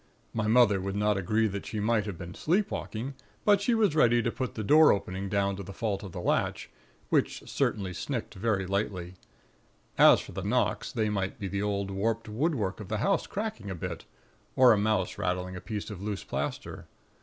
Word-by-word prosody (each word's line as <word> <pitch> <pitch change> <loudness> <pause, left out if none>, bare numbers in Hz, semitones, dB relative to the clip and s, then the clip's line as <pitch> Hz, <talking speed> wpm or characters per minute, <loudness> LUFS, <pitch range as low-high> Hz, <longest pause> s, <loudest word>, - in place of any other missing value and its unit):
My 110 -1 -1
mother 110 -4 +5
would 95 +1 -3
not 105 0 +2
agree 105 +4 +1
that 100 0 -5
she 110 - -3
might 110 0 +1
have 100 -4 -5
been 90 0 -8
sleepwalking; 140 - -1 0.3
but 205 -1 +5
she 235 +3 +2
was 210 -8 +2
ready 120 -5 +4
to 120 - 0
put 130 0 -4
the 110 - -3
door 155 +8 +7
opening 95 0 -2
down 100 -1 +1
to - - -5
the 100 +1 -8
fault 105 -4 -2
of 100 - -8
the 90 - -6
latch, - - -1 0.4
which - - 0
certainly 95 -3 -1
snicked 120 +5 -4
very 100 -1 0
lightly. 95 -2 -2 0.9
As - - +8
for - - -9
the - - -5
knocks, - - 0
they 110 -1 0
might 95 -2 -2
be 100 - -4
the 100 +1 -2
old 100 -1 -1
warped 110 +4 -1
woodwork 110 - -1
of 105 - -7
the 110 - -2
house 195 - +1
cracking 200 - -4
a 95 - -4
bit, 85 -1 -6 0.5
or 125 -2 +7
a - - +2
mouse 105 -3 0
rattling 90 0 -2
a 90 - -7
piece 105 -1 -5
of 100 -3 -8
loose 105 -1 -3
plaster. - - -4
105 Hz, 200 wpm, -29 LUFS, 95-115 Hz, 0.9 s, As